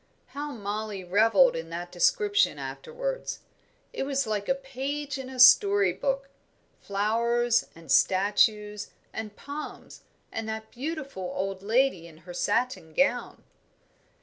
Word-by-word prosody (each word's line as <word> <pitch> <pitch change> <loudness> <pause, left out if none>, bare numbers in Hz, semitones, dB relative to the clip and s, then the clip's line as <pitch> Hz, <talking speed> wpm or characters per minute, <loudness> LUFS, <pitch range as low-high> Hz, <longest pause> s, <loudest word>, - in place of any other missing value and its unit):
How 290 +3 -5
Mollie 210 -3 -4
revelled 225 +8 +4
in 165 0 -5
that 175 +1 -6
description 405 - +2
afterwards; - - -5 0.5
it - - -4
was 275 0 0
like 210 -1 -2
a 270 - +3
page 275 +1 -4
in 260 -1 -7
a 260 -1 -8
story 200 -6 +7
book 275 +8 -2 0.5
flowers 235 +4 +1
and 165 -4 -9
statues 210 +3 +2 0.2
and 215 -2 -6
palms, 290 +2 -8 0.3
and 225 0 -4
that 220 0 -5
beautiful 275 - -5
old 195 0 -3
lady 220 -4 +1
in 160 -2 -15
her 180 - -8
satin 205 -4 -1
gown. 245 -3 +1
225 Hz, 125 wpm, -27 LUFS, 200-270 Hz, 0.5 s, story